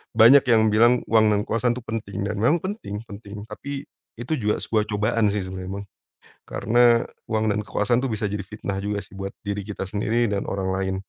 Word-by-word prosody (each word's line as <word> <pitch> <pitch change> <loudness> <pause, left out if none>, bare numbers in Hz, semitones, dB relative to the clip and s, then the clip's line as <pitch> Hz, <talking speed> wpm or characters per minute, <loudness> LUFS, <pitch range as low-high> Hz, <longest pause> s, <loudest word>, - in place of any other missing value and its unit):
banyak 120 +5 +8
yang 110 -2 +5
bilang 120 +3 +4
uang 110 -1 +6
dan 105 0 +2
kekuasaan 120 +1 +1
itu 125 - -7
penting, 105 -3 -4
dan 105 0 -3
memang 150 +10 +4
penting 185 - -5
penting 100 -1 -9
tapi 140 +6 -6 0.4
itu 120 +5 -6
juga 105 -1 +1
sebuah 110 -2 0
cobaan 105 +1 +1
sih 100 -2 -1
sebenarnya 95 0 -6
Bang. 100 - -8 0.6
Karena 115 - +3 0.3
uang 110 0 +1
dan 105 - 0
kekuasaan 120 +4 +1
itu - - -1
bisa 105 -2 -1
jadi 100 -2 -4
fitnah 100 -1 -5
juga 100 0 -2
sih 95 - -14
buat 95 0 -5
diri 100 -1 -4
kita 105 -2 -5
sendiri 110 +3 0
dan 100 -1 -2
orang 95 -1 -2
lain. 95 0 -1
105 Hz, 200 wpm, -24 LUFS, 100-115 Hz, 0.6 s, banyak